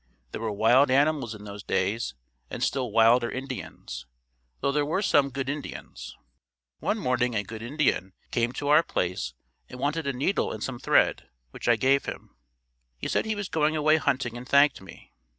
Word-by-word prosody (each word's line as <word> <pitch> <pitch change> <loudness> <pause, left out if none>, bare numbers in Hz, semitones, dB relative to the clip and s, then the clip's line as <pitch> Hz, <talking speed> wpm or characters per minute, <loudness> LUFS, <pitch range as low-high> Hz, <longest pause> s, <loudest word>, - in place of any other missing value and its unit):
There - - -5
were 110 -1 -1
wild 115 +7 +4
animals 140 -3 +2
in 105 - -11
those 100 0 -8
days, 95 - -1 0.3
and - - -4
still 130 -4 -1
wilder 115 +2 +5
Indians, 130 - -7 0.5
though 140 - +1
there 145 +1 +1
were 170 +8 -1
some 145 -7 +3
"Good 135 0 -4
Indians." 145 +1 -6 0.6
One 215 - 0
morning 125 - 0
a 105 - 0
"Good 110 +2 -8
Indian" 120 -8 0 0.2
came 120 -1 +1
to 145 - -3
our 150 +2 +7
place 90 - -2 0.3
and 125 - -9
wanted 145 +3 -1
a 140 - 0
needle 140 +10 0
and 110 - -6
some 130 -3 -4
thread, - - +2 0.2
which - - -7
I 120 - +6
gave 135 +4 +2
him. - - -8 0.6
He - - -4
said - - 0
he 220 0 -1
was 205 -2 -4
going 155 -2 +1
away 155 +1 +4
hunting 130 -5 -1
and 125 +2 -9
thanked 140 -3 +4
me. 95 -2 -14
130 Hz, 185 wpm, -27 LUFS, 115-145 Hz, 0.6 s, our